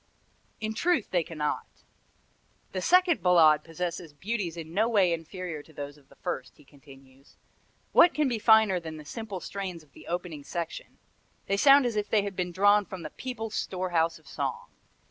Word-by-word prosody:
In 220 0 -3
truth 335 - 0
they 175 - +2
cannot. 150 -2 -3 1.0
"The - - -3
second 360 - +4
Ballade 160 -4 +5
possesses 170 -1 -5
beauties 185 +1 -3
in 160 0 -8
no 220 +5 +2
way 195 -6 +3
inferior 165 -1 -5
to 160 - -19
those 145 0 -7
of 145 -2 -23
the 140 - -19
first," 130 - -5
he 150 - -20
continues. 135 -1 -18 0.6
"What 345 - +6
can 300 -2 +2
be 240 -3 -1
finer 220 -4 +5
than 160 -2 -8
the 150 - -11
simple 210 +2 -6
strains 185 -4 -6
of 145 - -26
the - - -15
opening 170 -4 -4
section! 170 +2 -6 0.5
They 195 - 0
sound 275 +4 +7
as 235 -2 -1
if 210 -1 -1
they 210 -2 +3
had 200 -1 -5
been 180 -1 -2
drawn 205 +3 +4
from 185 -2 -8
the 155 - -7
people's 225 -4 -6
store 185 -2 -3
house 165 0 +1
of 160 - -22
song. - - -4
180 Hz, 185 wpm, -28 LUFS, 160-215 Hz, 1.0 s, sound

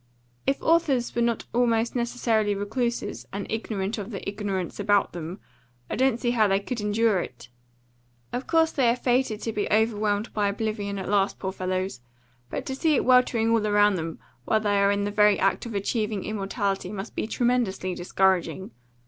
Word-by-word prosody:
If 275 - +2
authors 300 -7 +2
were 240 - 0
not 235 -1 0
almost 235 -1 +2
necessarily 230 -3 +1
recluses, 235 +4 -3
and 200 0 -4
ignorant 215 -1 -2
of 205 +1 -6
the 200 -5 -6
ignorance 200 -3 -3
about 205 0 +2
them, 175 +3 -6 0.5
I - - 0
don't 260 -2 +2
see 240 -1 0
how 220 -3 +3
they 195 0 +2
could 230 +3 -4
endure 210 -1 +2
it. 120 -6 -7 0.8
Of 250 +2 -3
course 325 -1 +3
they 255 -4 +2
are 235 - +3
fated 245 -3 0
to 225 - -1
be 205 -1 -1
overwhelmed 215 -1 +1
by 205 -1 +1
oblivion 205 -1 -2
at 190 - -5
last, 200 -1 +1
poor 190 - -3
fellows; 185 -6 -3 0.5
but - - -4
to 265 - -3
see 310 +2 +2
it - - +1
weltering 250 -3 +4
all 230 - +4
round 205 -1 +3
them 165 -2 -4 0.3
while 220 - +2
they 205 -2 +1
are 200 0 +4
in 200 0 +1
the 205 - -1
very 210 -1 +4
act 195 +4 +1
of 230 - -6
achieving 210 0 -1
immortality 200 -2 -2
must 205 +1 -6
be - - -2
tremendously 235 -7 0
discouraging. 190 +1 0
210 Hz, 180 wpm, -26 LUFS, 200-235 Hz, 0.8 s, weltering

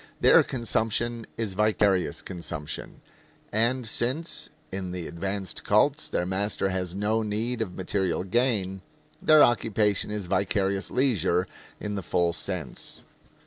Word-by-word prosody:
Their - - +7
consumption 115 -1 -1
is 110 -4 -2
vicarious 105 -2 +2
consumption; 80 -4 -6 0.5
and 120 +3 +1
since, 130 +10 -2 0.2
in 95 -1 -4
the 90 -2 -4
advanced 95 +3 -3
cults, 140 +8 +3
their 90 - -1
master 95 +1 0
has 90 -1 -2
no 105 +3 +1
need 110 +3 -2
of 90 -5 -3
material 95 -1 -1
gain, 95 -3 +1 0.4
their 155 -1 +7
occupation 105 -4 +2
is 105 -2 -3
vicarious 100 +1 +1
leisure 110 - +2 0.3
in 105 - -4
the 100 - -2
full 85 -1 +1
sense. 85 -3 -4
100 Hz, 125 wpm, -27 LUFS, 95-115 Hz, 0.5 s, Their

